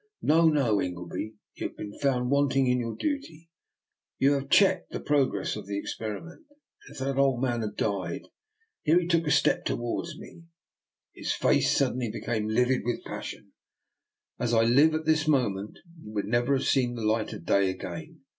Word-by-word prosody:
No! 160 +2 +5
no! 125 -10 +2
Ingleby, 90 +4 -5 0.2
you - - -3
have - - -17
been 105 -1 -7
found 130 -3 +1
wanting 140 -1 +3
in 125 0 +2
your 115 -2 -3
duty; 170 - -4 0.7
you 135 +1 +4
have 140 -1 -1
checked 190 -3 +4
the - - -5
progress 145 -3 0
of - - -8
the 100 0 -3
experiment, 110 - -6 0.4
and - - -12
if - - -11
that 135 +1 -2
old 135 -3 +3
man 120 -3 0
had 105 -2 -4
died 95 -5 -2 0.2
" 435 0 -55
— 450 -1 -44
here 165 +2 +4
he 180 - -3
took 165 -2 +1
a - - +2
step - - +3
towards 135 +7 -3
me, - - -10
and 170 - -16 0.7
his - - -2
face - - +2
suddenly 125 -2 0
be - - -5
came 110 -3 -1
livid 125 +4 +2
with 120 0 -2
passion - - -7 0.4
— - - -53
"as 120 -1 +1
I 115 - +5
live 140 +7 +5
at 155 0 -3
this 155 -1 +2
moment 105 -9 0 0.2
you 105 - -10
would 105 -2 -1
never 120 +5 +2
have 130 - -1
seen 125 -2 +2
the 115 -2 -4
light 110 0 +1
of 80 - -9
day 100 +1 +3
again. 95 -2 -7
125 Hz, 200 wpm, -27 LUFS, 110-155 Hz, 0.7 s, No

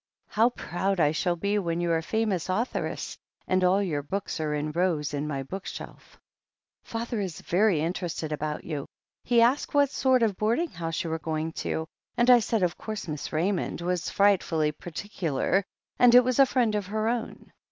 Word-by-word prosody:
How 225 +3 +4
proud 195 -4 -2
I 150 -2 +4
shall 175 +2 0
'be 200 +4 0
when 170 -3 -1
you're 170 -1 +1
a - - -5
famous 210 -1 -1
juthoress, 215 +7 -2 0.3
and 185 0 +2
all 190 +3 +4
your 155 -7 -1
books 190 +5 -4
are 155 -1 -1
in 150 +1 -2
rows 160 -4 0
in 145 +1 -2
my 140 -3 -3
bookshelf. 190 +8 -8 0.6
"Father 230 0 -4
is 185 -5 -5
very 185 -3 +2
interested 165 -2 -3
about 150 0 -3
you. 150 -4 -4 0.4
He 235 -1 +4
asked 260 +5 +1
what 285 -1 +4
sort 260 -3 +3
of 205 -4 +1
boarding 235 +11 +1
house 165 +1 -3
you 165 - -4
were 160 - -2
going 160 0 -2
to, 160 - -2 0.3
and 240 +1 +5
I 245 - +8
said 225 -2 0
of 175 -1 0
course 215 -4 -5
Miss 150 -2 -5
Raymond 175 +2 -1
was 180 -1 -1
frightfully 175 -6 +2
partic 175 +6 -9
ular, 165 +4 +2 0.4
and 245 -1 +7
it 250 - +9
was 255 +1 0
a 275 - +7
friend 245 -4 +1
of 205 -3 -2
her 215 +2 -1
own. 235 0 -3
185 Hz, 190 wpm, -27 LUFS, 160-220 Hz, 0.6 s, it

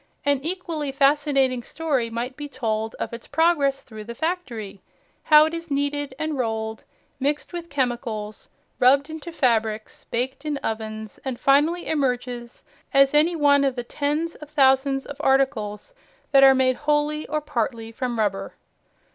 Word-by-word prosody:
An 285 -1 +3
equally 330 -4 -3
fascinating 275 -2 +2
story 270 -3 -1
might 240 +3 -4
be 290 0 -7
told 225 -4 -2
of - - -5
its 235 - -8
progress 295 -5 +2
through 220 -3 -10
the 235 +1 -7
factory, 240 - -4 0.4
how 305 0 +8
it 315 - -3
is 335 0 -5
kneaded 285 -1 -1
and 310 -2 -3
rolled, 220 -2 -3 0.3
mixed 290 +5 -1
with 340 -1 -6
chemicals, 240 -6 -3 0.3
rubbed 280 +4 +4
into 320 +2 -7
fabrics, 225 -7 0
baked 260 +4 -3
in 300 -2 -2
ovens, 220 -1 -4
and 260 -3 -4
finally 300 +6 +3
emerges 250 -4 -2 0.3
as 275 -1 +5
any 315 +4 +4
one 285 -2 +4
of 270 -2 +1
the 245 - -3
tens 300 +6 -2
of 300 - -12
thousands 270 -2 +3
of 285 - -8
articles 265 - 0 0.4
that 275 - +6
are 270 0 +8
made 255 -1 +2
wholly 300 +1 0
or 305 +1 -1
partly 230 -5 -3
from 240 0 -3
rubber. 195 -3 -1
270 Hz, 155 wpm, -24 LUFS, 235-295 Hz, 0.4 s, how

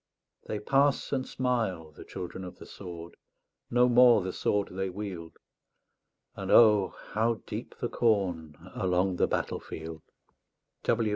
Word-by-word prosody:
They 105 - -2
pass 135 +5 +2
and 130 -2 -1
smile, 110 -11 -1
the 75 - -12
children 90 +1 -7
of 90 -1 -9
the - - -11
sword 85 -3 -9 0.5
No 125 +1 +4
more 120 -4 +6
the 95 0 -4
sword 100 -1 0
they 95 +1 -2
wield; 90 -4 -7 1.0
And - - -6
O, 105 -4 +6 0.2
how 110 +2 0
deep - - -6
the - - -2
corn 90 -9 0 0.2
Along 95 -5 0
the - - +3
battlefield! 80 0 -4
95 Hz, 130 wpm, -29 LUFS, 90-115 Hz, 1.0 s, more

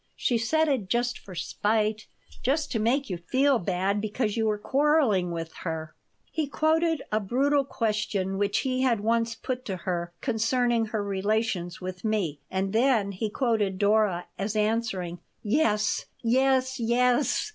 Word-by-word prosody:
She 240 -2 +1
said 315 +8 +2
it 250 -10 0
just 240 +1 0
for 185 - -11
spite, 215 +4 0 0.3
just 290 +4 0
to 225 - 0
make 255 +6 +1
you 175 - -3
feel 260 +8 +2
bad, 190 +2 0
because 215 0 -1
you 225 -1 +1
were 210 -1 +1
quarreling 265 - +2
with 165 -1 -5
her." 160 -2 -5 0.4
He 315 -2 -1
quoted 320 +2 +1
a 215 - +2
brutal 275 +7 +2
question 210 -6 -1
which 205 0 +1
he 255 -1 -1
had 240 -5 +2
once 230 +1 +1
put 255 +1 -4
to 195 - -3
her 175 -1 -3
concerning 235 -1 +1
her 215 -1 -2
relations 200 -3 -1
with 185 0 -6
me, 200 -10 -1
and 190 +1 -2
then 225 -4 +3
he 205 +3 -3
quoted 210 -5 0
Dora 205 -3 +2
as 200 +2 -2
answering: 210 -5 -1 0.2
"Yes, 210 -3 +1 0.2
yes, 260 +2 +2
yes! 245 - +2
220 Hz, 155 wpm, -27 LUFS, 195-255 Hz, 0.4 s, then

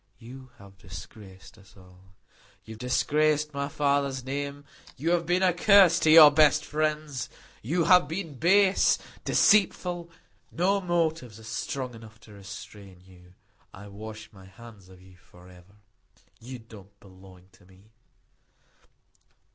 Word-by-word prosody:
"You 130 +3 -13
have 100 -1 -17
disgraced 95 +3 -13
us 95 -1 -21
all. 90 0 -20 0.5
You 110 - -12
have 110 - -14
disgraced 150 +4 0
my 140 0 -4
father's 140 -2 -1
name. 140 +2 -6 0.3
You 160 +6 -2
have 170 -1 0
been 180 +2 +1
a 180 -1 +3
curse 180 -2 +5
to 160 - +1
your 155 -2 +9
best 150 0 +3
friends. 150 -3 -3 0.3
You 165 +9 -1
have 180 -2 +4
been 165 0 -6
base, 195 +3 +3 0.3
deceitful; 180 -4 +1 0.4
no 195 +4 0
motives 160 - -2
are - - -15
strong 125 +3 -5
enough 110 -1 -14
to 105 - -16
restrain 100 -1 -12
you. 90 -1 -20 0.4
I 100 +1 -12
wash 110 +1 -11
my 95 -2 -16
hands 100 0 -16
of 95 -1 -17
you 95 -1 -19
forever. 90 +2 -19 0.6
You 125 +3 -9
don't 105 -3 -17
belong 95 -1 -18
to 90 - -24
me." 95 +3 -23
125 Hz, 140 wpm, -26 LUFS, 100-155 Hz, 0.6 s, your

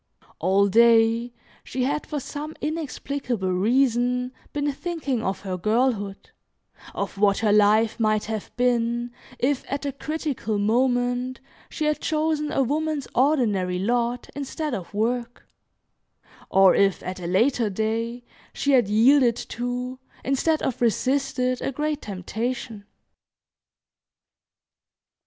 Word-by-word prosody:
All 195 +4 +3
day 230 +2 +4 0.3
she 255 0 -3
had, 290 +3 -1
for 300 - -3
some 300 +3 -6
inexplicable 280 - -3
reason, 250 +4 +2 0.2
been 290 0 -1
thinking 285 -5 -3
of 190 -2 -2
her 185 -2 -4
girlhood, 215 -1 0 0.6
of 200 0 -4
what 200 -1 +4
her 215 -2 +2
life 215 +2 +4
might 215 -1 +1
have 220 -1 -5
been 240 -1 +1 0.3
if, 270 +1 0
at 280 +1 -2
a 280 - -1
critical 280 -6 -3
moment, 245 +3 +1 0.3
she 310 - -3
had 300 0 +1
chosen 310 -1 0
a 270 - +2
woman's 300 +1 -1
ordinary 220 -10 +2
lot 240 +4 0
instead 285 +1 -4
of 185 -7 -5
work, 235 +3 -2 1.0
or 190 -1 +6
if, 195 -1 +2
at 185 0 -5
a 175 - -5
later 230 +5 +2
day, 225 +4 -2 0.3
she 280 - 0
had 250 -6 +4
yielded 235 +3 +5
to, 250 +2 -4 0.3
instead 305 +4 +1
of 250 - -2
resisted, 255 +1 +1
a - - -1
great 300 +2 -2
temptation. 220 +3 -4
245 Hz, 120 wpm, -24 LUFS, 215-275 Hz, 1.0 s, or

